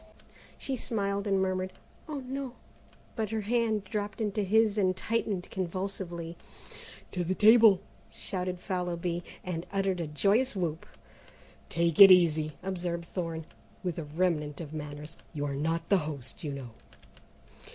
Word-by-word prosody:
She 270 - -2
smiled 200 -4 -1
and 195 -1 +3
murmured, 185 0 -1 0.4
"Oh, 290 -3 -3
no!" 265 0 -5 0.6
but 220 -3 -1
her 220 0 -1
hand 220 -1 +1
dropped 205 +2 -4
into 210 -1 0
his 215 +2 +3
and 185 -3 +2
tightened 205 -4 -1
convulsively. 180 -2 -4 0.7
"To 180 - -1
the 185 +2 -1
table!" 220 -2 +7 0.3
shouted 185 -2 -3
Fallowby, 175 -2 -2 0.2
and 170 -2 -4
uttered 195 -2 0
a 165 - -2
joyous 200 - +2
whoop. 170 -4 -2 0.8
"Take 170 +1 +2
it 195 - +13
easy," 160 -4 +5
observed 175 -2 -2
Thorne, 165 -3 -4 0.4
with 175 -3 -2
a - - -3
remnant 150 -2 -1
of 160 -3 -7
manners; 150 +1 -7 0.2
"you 145 -1 -1
are 140 - -2
not 165 +4 -1
the 200 - +6
host, 150 0 -5
you 150 - -2
know." 135 -4 -6
185 Hz, 140 wpm, -30 LUFS, 165-205 Hz, 0.8 s, it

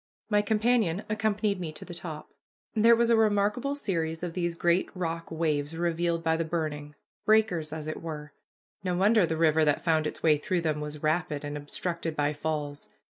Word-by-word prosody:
My 205 0 +5
companion 215 -3 +1
accompanied 210 -2 0
me 170 -3 -4
to - - -10
the 175 - -8
top. 160 -3 -7 0.4
There 230 +2 +6
was 235 0 +3
a - - +6
remarkable 215 +5 +2
series 165 - -2
of 175 -2 -3
these 175 -1 -1
great 175 +2 +2
rock 165 -2 -3
waves 155 -1 -1
revealed 170 0 0
by 160 0 +2
the 165 - 0
burning; 155 -3 -3 0.3
breakers, 210 -8 +2
as 155 -1 -5
it 155 - -5
were. 150 -3 -6 0.5
No 180 -2 0
wonder 210 +4 +4
that - - -9
the 160 - -1
river 160 -1 +4
that 150 -1 +2
found 160 -2 +2
its - - -7
way 155 -2 +4
through 175 +3 -1
them 155 -2 -1
was 150 0 -6
rapid 155 -2 0
and 145 0 -4
obstructed 165 +2 -4
by 145 0 +1
falls. 145 -1 -4
165 Hz, 190 wpm, -28 LUFS, 155-200 Hz, 0.5 s, There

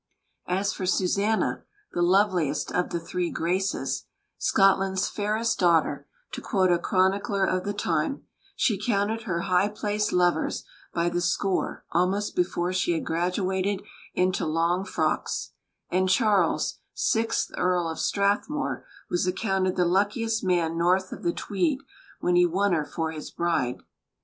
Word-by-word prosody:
As 195 +4 0
for 185 - -4
Susanna, 200 +4 +1 0.3
the 175 - -1
loveliest 180 -5 +2
of 180 - 0
the 170 - -2
"three 175 +1 -2
Graces" 185 +4 -1 0.3
"Scotland's 195 -1 +3
fairest 215 +2 -1
daughter," 170 -4 +2 0.2
to - - -6
quote 190 -5 +2
a 175 - +3
chronicler 195 +2 +1
of 185 0 -1
the 205 - -1
time 175 - -1 0.3
she 220 -7 +1
counted 220 0 0
her 170 -5 -1
high 185 +1 +2
placed 210 0 -1
lovers 175 -3 +1 0.3
by 170 0 0
the 175 0 -1
score 185 +2 -1
almost 185 +4 +1
before 180 0 0
she 185 -1 +1
had 160 - -2
graduated 185 +3 -1 0.3
into 185 +1 +1
long 170 +4 +1
frocks; - - -1 0.4
and 185 +1 +2
Charles, 205 -5 +2 0.2
sixth 225 0 0
Earl 180 -1 +1
of 160 - -5
Strathmore, 205 +9 0 0.2
was 175 +1 0
accounted 190 -1 0
the 180 - +2
luckiest 210 +5 +1
man 170 -3 +1
north 185 +2 +2
of - - -7
the 170 - +1
Tweed 260 - -1 0.4
when 180 - +2
he 175 0 +5
won 190 +3 +1
her 155 -3 +1
for 160 +1 -3
his 155 -1 -7
bride. 165 -8 -1
185 Hz, 145 wpm, -26 LUFS, 175-200 Hz, 0.4 s, he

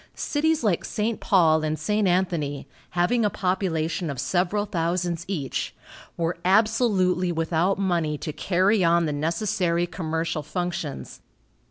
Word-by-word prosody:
Cities 310 -1 0
like 200 -6 +1
St. 220 +1 -2
Paul 160 -5 +3
and 155 0 -1
St. 210 +2 0
Anthony, 170 -6 0 0.3
having 225 +7 +2
a 210 - +3
population 180 -4 -1
of 140 -3 -5
several 190 +3 0
thousands 175 -1 -1
each, 155 -9 -3 0.4
were 170 0 -1
absolutely 190 -3 +2
without 165 +3 +1
money 170 -6 0
to 155 - -5
carry 190 +4 +2
on 170 0 +3
the 150 - -1
necessary 170 +2 0
commercial 165 -2 -3
functions. 175 -1 -4
175 Hz, 130 wpm, -25 LUFS, 165-195 Hz, 0.4 s, Paul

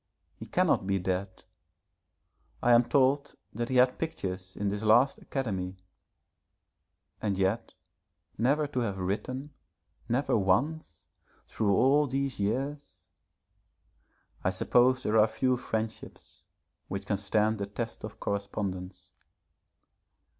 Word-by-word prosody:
He - - -10
cannot 95 - +2
be 100 0 +2
dead. 95 +1 -3 1.2
I 120 - +4
am 120 0 +6
told 140 0 +2 0.2
that 120 +2 -3
he 130 - -1
had 125 0 +4
pictures 95 - -4
in 100 0 -1
this 100 +1 -3
last 120 +6 +4
Academy 95 -8 -3 1.4
and 100 -3 -1
yet, 95 +4 0 0.6
never 140 +8 +2
to 140 -3 -3
have 105 -5 -1
written 130 +10 -3 0.6
never 130 +5 +1
once, 115 +11 0 0.4
through 100 -3 +1
all 145 +5 +4
these 135 -1 -2
years. 135 +8 -3 1.3
I - - +3
suppose 130 +1 +3
there 110 +1 +3
are 105 - +6
few 125 +4 +1
friendships 110 -2 -5 0.5
which 95 +1 -5
can 100 - 0
stand 105 +2 +1
the 100 - -3
test 115 +3 -5
of 105 0 -8
correspondence. 100 -2 -4
110 Hz, 120 wpm, -29 LUFS, 100-130 Hz, 1.4 s, am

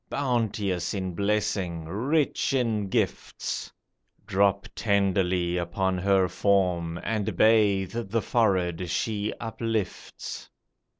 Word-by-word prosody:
Bounteous 110 -9 -1
in 95 -2 -3
blessing, 100 -4 -1
rich 135 - 0
in 110 -6 0
gifts, - - -2 0.5
Drop 100 0 +2
tenderly 95 -4 +1
upon 90 +2 -1
her 95 0 +3
form, 90 -3 +1
And 110 -3 -2
bathe 105 -3 +4
the 115 +2 +1
forehead 90 -6 +1
she 105 +3 -1
uplifts. 115 -3 -4
100 Hz, 95 wpm, -27 LUFS, 90-110 Hz, 0.5 s, bathe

